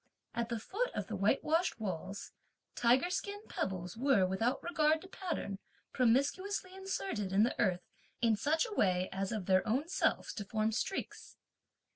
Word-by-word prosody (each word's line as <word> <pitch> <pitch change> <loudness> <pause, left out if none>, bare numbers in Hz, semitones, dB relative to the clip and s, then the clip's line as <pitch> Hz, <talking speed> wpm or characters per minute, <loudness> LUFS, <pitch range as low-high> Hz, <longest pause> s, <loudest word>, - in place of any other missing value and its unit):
At 235 0 -2
the 235 - -1
foot 445 - -2
of 205 - -2
the 220 - -4
white 200 +7 +2
washed 325 -3 +1
walls, 195 -1 -4 0.4
tiger 250 +9 +3
skin 405 +2 -2
pebbles 180 -2 -3
were, 235 -5 +4
without 190 +7 0
regard 315 -2 +3
to - - -10
pattern, 340 - -4 0.3
promiscuously 330 - +1
inserted 385 - -3
in 200 +2 +5
the 235 - +2
earth 180 -5 +1 0.4
in 230 -2 +3
such 310 - +1
a 450 - -6
way 185 - +2
as 195 0 -2
of 215 -5 -2
their 185 0 +4
own 260 +8 +1
selves - - +1
to 210 - -4
form 215 +2 0
streaks. 380 - -4
230 Hz, 165 wpm, -34 LUFS, 195-330 Hz, 0.4 s, in